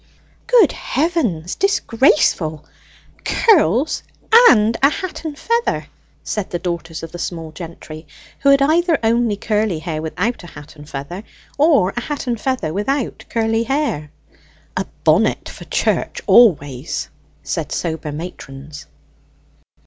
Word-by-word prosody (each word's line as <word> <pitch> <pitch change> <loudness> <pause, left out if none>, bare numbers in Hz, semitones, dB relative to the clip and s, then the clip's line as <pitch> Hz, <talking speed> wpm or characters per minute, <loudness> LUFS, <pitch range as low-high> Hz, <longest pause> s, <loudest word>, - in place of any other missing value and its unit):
"Good 475 - +5
heavens 245 - -1
disgraceful! 230 - +2 0.6
Curls 310 - +3 0.5
and 215 +1 +4
a 275 - +6
hat 370 +2 -5
and 300 -2 -5
feather!" 465 +6 -1 0.3
said 210 -3 -3
the 175 - -2
daughters 170 -2 -5
of 165 - -7
the 175 - -8
small 165 -2 -5
gentry, 160 -1 -10 0.3
who 280 - +3
had 275 0 +5
either 330 +2 +3
only 230 -1 +2
curly 210 -3 0
hair 155 -1 -4
without 180 +8 -2
a - - -10
hat 145 -2 -12
and 145 0 -13
feather, 145 +9 -6 0.3
or 285 - +3
a 245 - -2
hat 290 +2 -4
and 235 -3 -2
feather 255 -13 -1
without 250 +7 -2
curly 225 0 +1
hair. 270 - -1 0.7
"A - - -2 0.2
bonnet - - +2
for - - -10
church - - -1
always," 145 - +3 0.3
said - - -3
sober 160 -3 -3
matrons. 145 -2 -9
210 Hz, 130 wpm, -19 LUFS, -, 0.7 s, a